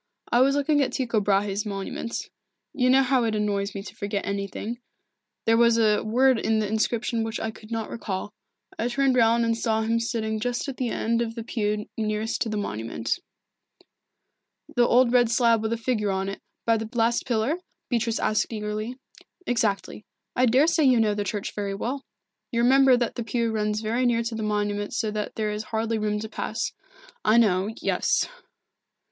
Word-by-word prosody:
"I 240 - +4
was 275 +2 +4
looking 290 +1 +2
at 270 - 0
Tycho 230 -5 0
Brahe's 200 0 +1
monument. 200 +2 -4 0.5
You 255 -2 +2
know 265 +1 +6
how 260 -1 +2
it 225 -1 0
annoys 200 -1 -1
me 200 - -4
to - - -9
forget 200 -1 -3
anything 200 +4 -4 0.7
there 225 0 +4
was 235 0 +5
a 215 -2 +3
word 250 +3 +3
in 220 0 +1
the 215 -1 0
inscription 225 +2 0
which 225 0 -3
I 220 - -2
could 215 0 -15
not 225 -1 -3
recall. 205 -2 -4 0.5
I 230 - +1
turned 270 +1 +2
round 230 -1 +4
and 230 0 +1
saw 220 -1 0
him 230 +1 +1
sitting 220 -2 -2
just 245 +4 -2
at 275 - -5
the 250 -2 -1
end 230 +1 0
of 225 -1 -3
the 230 - -5
pew 210 -2 -1
nearest 215 +1 -1
to 225 - 0
the 215 - -2
monument." 115 - -3 1.6
"The 240 -1 +4
old 245 0 +4
red 245 -2 +5
slab 230 -1 +3
with 220 0 -2
a 230 - 0
figure 225 -3 -1
on 190 0 -1
it, 195 - -7 0.2
by 230 -1 +3
the 220 0 -5
last 235 +2 +1
pillar?" 240 +6 +1 0.3
Beatrice 230 -2 0
asked 215 +2 +1
eagerly. 215 +2 -4 0.5
"Exactly. 215 -5 -1 0.3
I 255 +1 +4
daresay 300 +6 +4
you 255 -3 +5
know 215 -2 +3
the 205 0 -2
church 205 0 -3
very 200 -1 -3
well. 260 +7 -3 0.5
You 235 -1 +1
remember 265 0 +6
that 240 -1 -1
the 235 - -4
pew 230 0 -1
runs 210 -1 -1
very 235 +3 +1
near 235 -1 +2
to 230 0 -3
the 225 - -4
monument 205 0 -1
so 220 -3 0
that 210 0 -4
there 215 -1 -1
is 210 +1 -4
hardly 225 0 -1
room 210 0 0
to 220 - -4
pass." 220 +1 -3 0.5
"I 220 - +4
know 200 -3 +3
yes." - - +1
225 Hz, 190 wpm, -25 LUFS, 210-240 Hz, 1.6 s, know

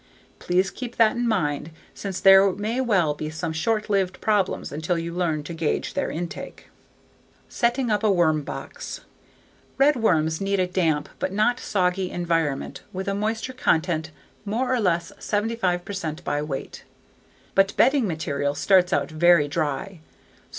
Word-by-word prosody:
Please 185 +2 +1
keep 245 -2 -7
that 225 -2 +4
in 240 0 0
mind 150 -8 0 0.2
since 195 -2 -5
there 195 0 +7
may 220 +6 -2
well 190 -11 +2
be 155 +1 -5
some 155 +1 -4
short 215 +7 0
lived 195 -3 0
problems 205 -3 0
until 160 +4 -1
you 170 0 -4
learn 165 -4 -1
to 170 - -7
gauge 160 -2 -2
their - - -1
intake. 170 +1 -6 0.8
Setting 240 0 0
Up 210 0 +1
a 215 - +4
Worm 165 -5 +3
Box - - -7 0.8
Redworms 210 - +2
need 195 0 0
a 185 - +3
damp 170 -5 0
but - - -1
not 215 +5 +1
soggy 185 -1 0
environment 165 -5 -1
with 190 +1 -5
a 200 - 0
moisture 220 +5 -2
content 160 -8 0 0.3
more 235 +5 -1
or 255 - +1
less 170 -5 0
75 205 -4 -1
percent 170 -6 -5
by 145 - -1
weight. 145 -3 -6 0.7
But 195 0 +2
bedding 270 -4 +4
material 145 -4 -2
starts 185 +2 +3
out 180 - 0
very 165 -1 +4
dry. 160 +5 -3
185 Hz, 150 wpm, -24 LUFS, 160-210 Hz, 0.8 s, there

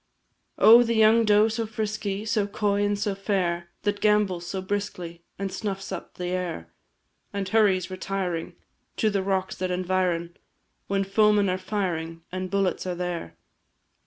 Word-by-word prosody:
Oh, 230 +2 +8
the 230 -1 +1
young 220 +1 +5
doe 210 +1 +5
so 225 0 -2
frisky, 215 -1 -3
So 215 -2 +1
coy, 205 0 0
and 205 0 +1
so 205 0 -1
fair, 180 -4 -1
That 205 -1 -1
gambols 205 -5 +2
so 190 - -3
briskly, 185 -3 -4 0.2
And 195 -1 -3
snuffs 195 -2 -4
up - - -7
the 180 0 -4
air; 175 - -4 0.6
And 200 -1 -3
hurries, 190 -4 +2
retiring, 185 -3 -3 0.4
To 215 - +2
the 200 -1 0
rocks 190 -1 -1
that 185 0 -2
environ, 180 -2 -1 0.5
When 195 0 +1
foemen 205 0 +3
are 185 - -2
firing, 165 -5 -3
And 185 0 -4
bullets 195 -2 0
are 180 - -2
there. 175 - -4
195 Hz, 155 wpm, -26 LUFS, 180-210 Hz, 0.6 s, Oh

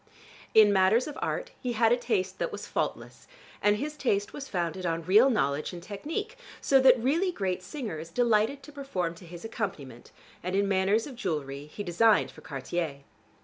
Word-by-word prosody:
In 210 -2 +7
matters 195 +6 +4
of 300 - -6
art, - - -2
he 245 -1 -2
had 225 0 +3
a - - +6
taste 190 -6 -1
that - - -1
was - - -6
faultless, - - -4 0.3
and 205 0 +4
his 295 +7 -4
taste 205 -8 0
was 275 -1 -7
founded 175 0 -2
on 165 -1 -1
real 215 +9 +6
knowledge 150 - 0
and 175 -1 -8
technique, 325 - -5 0.2
so 270 - +4
that 260 -1 +7
really 325 +10 +1
great 190 - -2
singers 185 - -6
delighted 235 +5 +1
to 295 - -11
perform 270 - -3
to 170 +1 -14
his 175 +4 -9
accompaniment, 155 - -5 0.3
and 180 +2 -3
in 200 0 +2
matters 195 +3 +2
of 270 - -8
jewelry 150 - -4
he 205 +7 -7
designed 205 +4 +3
for - - -15
Cartier. 140 +1 -4
205 Hz, 185 wpm, -28 LUFS, 175-250 Hz, 0.3 s, In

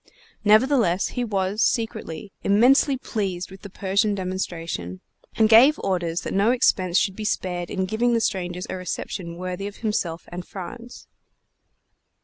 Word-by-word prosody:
Nevertheless, 215 -4 +3
he 245 - -3
was, 200 -1 -1
secretly, 215 -5 -1
immensely 255 +7 +4
pleased 195 -7 -3
with 190 - -12
the 200 - -9
Persian 200 +2 0
demonstration, 170 - -4 0.4
and 220 - +4
gave 250 +8 +7
orders 175 -3 -1
that - - -5
no 200 +3 +3
expense 185 -8 +2
should 195 - +1
be 215 - -6
spared 180 -4 -2
in 190 0 -1
giving 235 +4 +1
the - - +3
strangers 180 -4 -2
a - - -4
reception 180 -1 -5
worthy 185 +2 -4
of 205 - -8
himself 180 -7 -2
and 175 +1 -5
France. 205 +7 -9
195 Hz, 145 wpm, -24 LUFS, 180-220 Hz, 0.4 s, gave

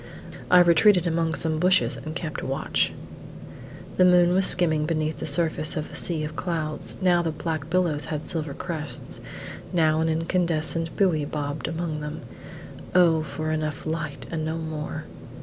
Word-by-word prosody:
I 180 0 +7
retreated 175 +2 +5
among 165 -1 0
some 160 -1 +1
bushes 185 +2 +3
and 155 +1 -7
kept 165 -3 -4
watch. 135 +1 0 1.1
The 185 - +5
moon 180 -1 +5
was 190 0 +4
skimming 160 -4 +3
beneath 155 -1 -1
the - - -3
surface 155 0 +1
of 155 - -4
a - - -9
sea 160 -3 +1
of 155 +1 -5
clouds: 160 -4 -3
now 175 -2 +4
the 165 - -1
black 155 -1 -4
billows 170 -5 +1
had 150 +2 -5
silver 155 -4 -2
crests: 155 -4 -4 0.5
now 160 -2 +2
an 160 - +1
incandescent 165 0 -1
buoy 175 -7 +2
bobbed 145 0 -4
among 160 -2 -3
them. 150 +1 -6 0.7
O 170 -3 +5
for 155 0 -4
enough 155 -1 -3
light, 155 -2 -4
and 160 -2 -2
no 160 +1 -2
more! 160 -2 -5
160 Hz, 160 wpm, -25 LUFS, 155-170 Hz, 1.1 s, I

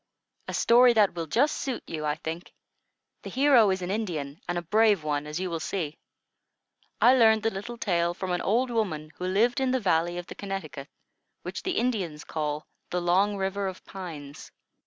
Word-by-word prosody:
"A - - -3
story 240 +1 +6
that 210 -3 +4
will 165 -2 -4
just 280 - +2
suit 265 -4 -4
you, 155 -2 -5
I 150 0 0
think. 165 +1 -6 0.7
The - - -7
hero 260 -5 +5
is 190 -1 -1
an 180 - -3
Indian, 165 -9 -3
and 175 - 0
a 175 - -3
brave 210 0 +3
one, 150 -1 -2
as 150 +3 -4
you 185 - -2
will 165 - -2
see. 160 -3 -4 1.0
I 250 - +7
learned 220 -3 +5
the 225 - +1
little 210 +5 -6
tale 175 -5 0
from 190 0 -4
an 175 - 0
old 240 +5 +1
woman 160 -10 -2
who 180 - -3
lived 230 +8 +2
in 265 -1 +1
the 260 0 +1
valley 175 -4 +1
of 175 - -5
the - - -8
Connecticut, 190 -8 -6 0.5
which - - -5
the 370 - -2
Indians 195 -11 -1
called 150 -1 -3 0.3
the 180 - -1
Long 190 +4 +2
River 195 +1 -1
of 185 -1 -7
Pines." 155 -7 -8
190 Hz, 195 wpm, -27 LUFS, 160-225 Hz, 1.0 s, I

